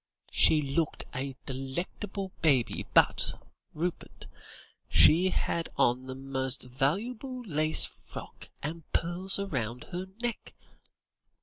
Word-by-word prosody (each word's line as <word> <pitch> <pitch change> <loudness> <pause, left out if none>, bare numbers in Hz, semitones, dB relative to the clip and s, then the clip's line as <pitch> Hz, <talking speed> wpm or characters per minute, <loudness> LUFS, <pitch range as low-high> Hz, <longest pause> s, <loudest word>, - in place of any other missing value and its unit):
She 155 -1 +5
looked 145 +3 -1
a 135 0 -3
delectable 175 +9 -4
baby, 135 -7 +2
but, - - +4 0.4
Rupert, 170 +3 -4 0.6
she 175 +5 +6
had 170 -2 -1
on 125 +2 +2
the 130 - -5
most 135 -1 -2
valuable 215 - -2
lace 155 -3 +5
frock, - - -11
and 160 +3 -4
pearls 180 +3 +1
round 125 - -3
her 180 +1 -4
neck. 240 -1 -4
155 Hz, 105 wpm, -29 LUFS, 135-185 Hz, 0.6 s, she